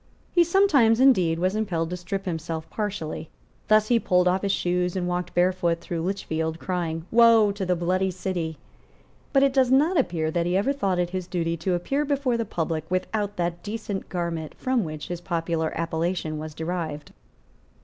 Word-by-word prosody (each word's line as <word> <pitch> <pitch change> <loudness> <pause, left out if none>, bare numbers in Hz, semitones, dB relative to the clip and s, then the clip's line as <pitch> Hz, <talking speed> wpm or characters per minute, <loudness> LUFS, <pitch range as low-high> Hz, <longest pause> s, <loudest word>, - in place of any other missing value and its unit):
He 345 - +5
sometimes, 310 - +4
indeed, 185 -12 +4
was 185 +3 0
impelled 175 -6 -1
to - - -1
strip 195 +2 -4
himself 165 -2 -4
partially. 190 -7 -4 0.4
Thus 215 0 +4
he 240 -1 +4
pulled 180 -3 +2
off 185 +1 +2
his 200 - 0
shoes 180 -1 0
and 180 -1 -1
walked 180 0 -3
barefoot 175 -1 +2
through 170 -1 -4
Lichfield, 160 -3 -2
crying, 165 -3 -3
"Woe 230 -2 +6
to 200 -2 -4
the 180 - +2
bloody 185 +2 0
city." 175 -3 -3 0.7
But 275 -1 +4
it 275 -1 +3
does 260 -2 +3
not 300 +6 +4
appear 165 -9 0
that 170 +1 0
he 180 +1 +2
ever 225 +8 +1
thought 195 -10 0
it 175 0 0
his 185 -1 -4
duty 170 -2 -1
to 180 +3 0
appear 275 +12 -1
before 280 -4 0
the 230 -1 -1
public 160 -4 -3
without 205 +3 -2
that 175 0 -2
decent 210 -1 -5
garment 170 -3 -3
from 255 -3 0
which 155 -1 -6
his 175 -1 -4
popular 165 -2 -1
appellation 165 -1 -2
was 155 -1 -7
derived. 160 -3 -4
180 Hz, 180 wpm, -25 LUFS, 165-215 Hz, 0.7 s, Woe